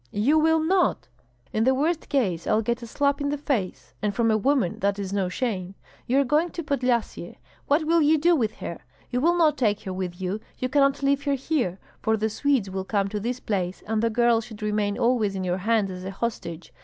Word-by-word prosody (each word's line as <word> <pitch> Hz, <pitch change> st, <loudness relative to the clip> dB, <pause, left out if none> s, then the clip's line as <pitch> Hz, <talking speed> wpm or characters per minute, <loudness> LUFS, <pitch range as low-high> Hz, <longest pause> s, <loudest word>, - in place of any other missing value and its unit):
"You 265 Hz, -, +2 dB
will 320 Hz, +1 st, +4 dB
not." 350 Hz, -, +1 dB, 0.4 s
"In 220 Hz, -, +1 dB
the 260 Hz, +2 st, +3 dB
worst 315 Hz, +4 st, -1 dB
case 190 Hz, -, 0 dB
I'll 220 Hz, +1 st, +2 dB
get 235 Hz, +2 st, -1 dB
a 235 Hz, -, -7 dB
slap 280 Hz, +4 st, 0 dB
in 285 Hz, -, 0 dB
the 290 Hz, -, -1 dB
face, 255 Hz, -10 st, -3 dB
and 205 Hz, -1 st, -1 dB
from 230 Hz, -2 st, +2 dB
a -, -, +3 dB
woman 255 Hz, -6 st, +1 dB
that 200 Hz, +1 st, 0 dB
is 200 Hz, -1 st, -4 dB
no 195 Hz, -3 st, 0 dB
shame. 190 Hz, -4 st, -3 dB, 0.3 s
You 260 Hz, +3 st, +3 dB
are -, -, +4 dB
going 300 Hz, +6 st, +2 dB
to 335 Hz, -, -4 dB
Podlyasye, 250 Hz, -5 st, -1 dB, 0.3 s
what 295 Hz, +3 st, +3 dB
will 335 Hz, +1 st, +3 dB
you 310 Hz, +1 st, +4 dB
do 340 Hz, +3 st, +4 dB
with 220 Hz, -7 st, 0 dB
her? -, -, -6 dB, 0.3 s
You 250 Hz, 0 st, 0 dB
will 345 Hz, +4 st, +3 dB
not 310 Hz, -4 st, +3 dB
take 210 Hz, -5 st, +1 dB
her 190 Hz, -3 st, -5 dB
with 185 Hz, -1 st, -4 dB
you, 190 Hz, +3 st, -2 dB, 0.2 s
you 255 Hz, -, -2 dB
cannot 275 Hz, 0 st, +2 dB
leave 280 Hz, +1 st, +1 dB
her 280 Hz, -1 st, +2 dB
here; 260 Hz, -, -1 dB, 0.2 s
for 220 Hz, 0 st, +1 dB
the 220 Hz, +1 st, 0 dB
Swedes 270 Hz, -3 st, +1 dB
will 190 Hz, 0 st, -3 dB
come 200 Hz, 0 st, 0 dB
to 210 Hz, +1 st, -3 dB
this 240 Hz, +4 st, -3 dB
place, 190 Hz, -6 st, -3 dB
and 220 Hz, 0 st, 0 dB
the 230 Hz, -, +2 dB
girl 235 Hz, 0 st, +3 dB
should 220 Hz, -1 st, -10 dB
remain 210 Hz, -1 st, 0 dB
always 230 Hz, -5 st, +1 dB
in 185 Hz, -1 st, -3 dB
our 180 Hz, +1 st, 0 dB
hands 210 Hz, 0 st, +1 dB
as 180 Hz, 0 st, -7 dB
a 190 Hz, -, -4 dB
hostage. 190 Hz, -5 st, -5 dB
230 Hz, 230 wpm, -25 LUFS, 200-280 Hz, 0.4 s, will